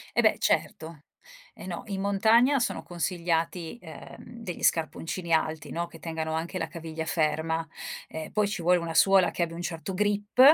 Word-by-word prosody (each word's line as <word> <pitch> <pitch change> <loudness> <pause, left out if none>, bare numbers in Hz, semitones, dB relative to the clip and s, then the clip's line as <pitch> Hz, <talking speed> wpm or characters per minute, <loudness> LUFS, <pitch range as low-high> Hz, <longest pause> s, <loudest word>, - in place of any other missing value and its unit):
Eh - - +4
beh - - +4
certo. 160 -2 -1 0.5
Eh - - -10
no 175 -2 -4
in 195 -2 -3
montagna 220 +7 +4
sono 240 - -1
consigliati, 170 +1 -2
ehm, 230 +7 -11
degli 180 -6 -6
scarponcini 165 +2 0
alti, 160 -1 +1
no, 170 +1 -2
che 165 -1 -14
tengano 160 0 -3
anche 165 +4 -2
la 165 - -1
caviglia 160 -1 -6
ferma 160 0 0 0.4
e 160 0 -6
poi 210 -1 +2
ci 200 -3 -3
vuole 180 +2 +4
una 170 -1 -4
suola 195 +1 +5
che - - -2
abbia 165 -1 -1
un 170 - -5
certo 175 +1 -4
grip, 205 +3 0
170 Hz, 175 wpm, -28 LUFS, 160-195 Hz, 0.5 s, suola